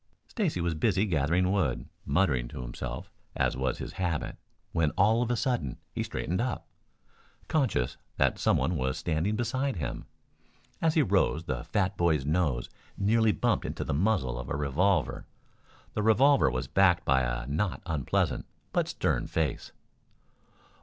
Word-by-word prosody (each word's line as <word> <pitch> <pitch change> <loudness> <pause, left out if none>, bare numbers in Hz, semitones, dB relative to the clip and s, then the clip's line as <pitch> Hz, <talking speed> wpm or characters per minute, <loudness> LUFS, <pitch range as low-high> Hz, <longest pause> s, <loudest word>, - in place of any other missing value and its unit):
Stacy 195 - -1
was 85 -1 0
busy 95 +4 +2
gathering 90 +1 +2
wood, 75 -12 0 0.2
muttering 70 -11 +2
to 60 - -7
himself - - -6 0.2
as - - +1
was 65 0 -1
his - - -6
habit, 85 -4 -1 0.4
when 80 -2 +2
all 110 +5 +4
of 120 - 0
a 120 - +2
sudden 120 - -1 0.2
he - - -2
straightened 90 +6 -2
up, 125 +1 -3 0.8
conscious 125 - 0 0.2
that - - +2
some - - +3
one 85 0 0
was 65 +1 -1
standing 85 +7 0
beside 130 +4 -1
him. 80 - -4 0.8
As 160 -1 +2
he 155 - +5
rose 95 - +2
the 65 -7 -3
fat 95 -1 0
boy's 80 -6 +2
nose 75 -6 +1 0.3
nearly 110 +2 +3
bumped - - +1
into - - -3
the - - -2
muzzle 75 - +1
of - - -6
a - - -1
revolver. 85 +7 +1 0.7
The 105 - -1
revolver 125 - +5
was 65 0 -3
backed 90 -3 +3
by 65 0 +4
a 60 0 -2
not 80 +9 -2
unpleasant, 80 -6 0 0.3
but - - +2
stern - - 0
face. 80 -6 -2
85 Hz, 155 wpm, -29 LUFS, 70-105 Hz, 0.8 s, he